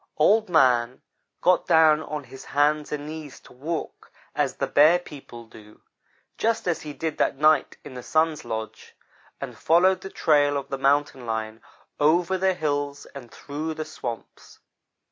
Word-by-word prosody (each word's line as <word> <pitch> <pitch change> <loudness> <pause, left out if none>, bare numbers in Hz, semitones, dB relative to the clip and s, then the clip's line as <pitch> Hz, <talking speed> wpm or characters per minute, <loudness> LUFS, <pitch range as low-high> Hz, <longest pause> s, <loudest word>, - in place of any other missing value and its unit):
"Old 210 +7 +3
man 125 -6 +2 0.4
got 180 0 +2
down 160 -2 +5
on 150 -2 -6
his 135 0 -12
hands 150 +1 0
and 145 -1 -4
knees 155 -2 -8
to - - -17
walk 155 +6 -6 0.2
as - - -1
the - - -1
Bear 155 +4 +5
people 135 -8 -11
do, 105 -1 -16 0.6
just 225 -3 0
as 175 - 0
he 150 - -7
did 160 +1 -5
that - - +1
night 155 0 +3
in - - -10
the 125 - -7
Sun's 160 +2 0
lodge, 110 0 -7 0.4
and - - -7
followed 185 +3 +3
the 190 - -7
trail 145 -5 +2
of 140 - -6
the 135 - -4
Mountain 135 -2 +1
lion 110 0 -4 0.4
over 170 +5 +2
the 190 0 +1
hills 145 -3 -3
and 130 -4 -10
through 155 +2 -6
the 155 - -5
swamps. 115 -4 -8
150 Hz, 165 wpm, -24 LUFS, 135-160 Hz, 0.6 s, down